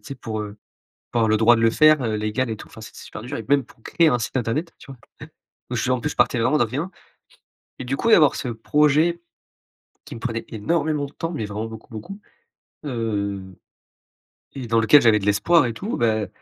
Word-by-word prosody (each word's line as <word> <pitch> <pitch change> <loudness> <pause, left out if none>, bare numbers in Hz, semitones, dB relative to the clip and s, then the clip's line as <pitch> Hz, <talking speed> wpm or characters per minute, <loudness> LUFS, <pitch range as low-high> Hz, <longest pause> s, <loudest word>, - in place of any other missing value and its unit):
sais, 140 - -8
pour, 110 -4 -5
heu, 105 0 -7 0.5
pour 120 - -1
avoir 110 - +2
le 110 - +3
droit 115 +2 +5
de 115 - -1
le 115 - +4
faire, 155 +2 +5
heu, 110 -3 -1
légal 110 +4 -1
et 110 - -3
tout. - - -12
Enfin, - - -13
c'est 110 - -11
c'est - - -11
super - - -9
dur, 120 +3 -6
et 115 - -6
même 140 +1 +3
pour 115 - -22
créer 165 +6 +2
un 125 - +2
site 120 +3 -2
internet, 140 +8 -2
tu - - -15
vois? 130 - -11 0.7
Eh! - - -2
Heu, - - -1
je 115 +3 -1
en 125 - -2
plus, 150 - -2
je - - -8
partais 125 - +2
vraiment 135 +6 +2
de - - +3
rien, 145 +11 -4 0.9
et 125 - -5
du 135 - -1
coup, 230 - -1
d'avoir 150 - +6
ce 125 - -4
projet, 150 +8 +2 0.9
qui - - -8
me - - -10
prenait 115 -1 -3
énormément 150 +6 -1
de 140 - -14
temps 165 - -4
mais, 135 -10 -4
vraiment 105 +2 -4
beaucoup, 110 -1 -10
beaucoup, 145 - -8 0.7
heu, 105 -6 -2 1.2
et 130 -3 -5
dans 115 0 +2
lequel 140 +6 +6
j'avais 110 -2 +4
de 95 - -6
l'espoir, 140 +9 +3
et 115 - -2
tout, 200 - -4
beh, 110 -3 0
120 Hz, 235 wpm, -22 LUFS, 110-145 Hz, 1.2 s, d'avoir